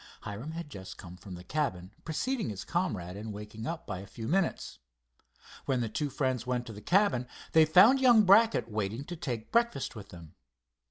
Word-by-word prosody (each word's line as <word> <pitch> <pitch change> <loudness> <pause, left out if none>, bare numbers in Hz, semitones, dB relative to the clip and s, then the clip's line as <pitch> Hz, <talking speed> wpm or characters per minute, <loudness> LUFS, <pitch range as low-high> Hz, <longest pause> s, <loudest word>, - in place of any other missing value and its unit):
Hiram 115 +10 -6
had 165 -2 -7
just 95 -6 -9
come 90 -2 -10
from 90 0 -10
the 90 - -10
cabin, 95 -9 -2
preceding 225 - -2
his 100 -3 -5
comrade 105 - -2
in 105 +2 -6
waking 105 +2 -7
up 170 0 -4
by 90 - -5
a 100 - -9
few 115 0 -7
minutes. 180 +4 -1 0.9
When 130 -2 0
the 115 - -2
two 145 +6 -2
friends 130 -3 -1
went 125 -1 -1
to 115 - -8
the 105 - -10
cabin 145 - +2 0.2
they 160 -1 +6
found 195 - +7
young 240 -4 +6
Brackett 205 - +5
waiting 110 +3 -3
to 175 - -7
take 125 -9 -5
breakfast 235 - +1
with 100 -2 -9
them. 85 -4 -12
125 Hz, 195 wpm, -30 LUFS, 105-170 Hz, 0.9 s, found